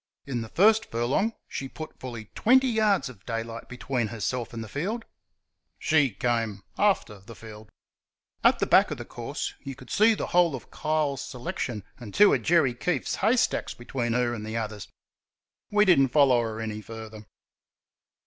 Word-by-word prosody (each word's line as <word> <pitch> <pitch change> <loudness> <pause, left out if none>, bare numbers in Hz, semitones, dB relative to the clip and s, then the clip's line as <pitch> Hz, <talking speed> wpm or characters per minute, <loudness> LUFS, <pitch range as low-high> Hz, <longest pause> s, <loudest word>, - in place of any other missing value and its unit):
In 130 -4 -3
the 115 - -7
first 215 - +4
furlong 125 - 0
she 135 - -5
put 155 +3 -9
fully 120 -4 -8
twenty 260 +3 +4
yards 215 - +2
of 115 -7 -12
daylight 115 0 -5
between 125 -2 -2
herself 115 +2 -3
and 115 -1 -5
the - - -8
field 205 - -3 0.7
she 150 -4 +3
came 115 -2 -2
after 190 - +1
the 110 +4 -13
field. 110 -1 -12 0.7
At - - +5
the - - 0
back - - +5
of - - -4
the - - -7
course - - -5
you 135 -1 -7
could 130 -1 -13
see 220 +2 +5
the - - -3
whole 175 -4 +4
of 120 - -10
Kyle's 150 -3 -1
selection 120 -4 -4 0.2
and 110 -5 -9
two 205 +1 +7
of - - +1
Jerry 165 -7 +3
Keefe's 165 +8 -2
hay 220 +5 +3
stacks - - 0
between 120 -1 -3
her 120 0 +1
and 110 -3 -5
the 110 +1 -4
others. 105 -3 -4 0.8
We 210 0 +4
did 180 -7 +6
n't 135 -2 +3
follow 135 -5 +5
her 110 -1 -4
any 110 -1 -4
further. 110 0 -9
125 Hz, 175 wpm, -27 LUFS, 115-160 Hz, 0.8 s, two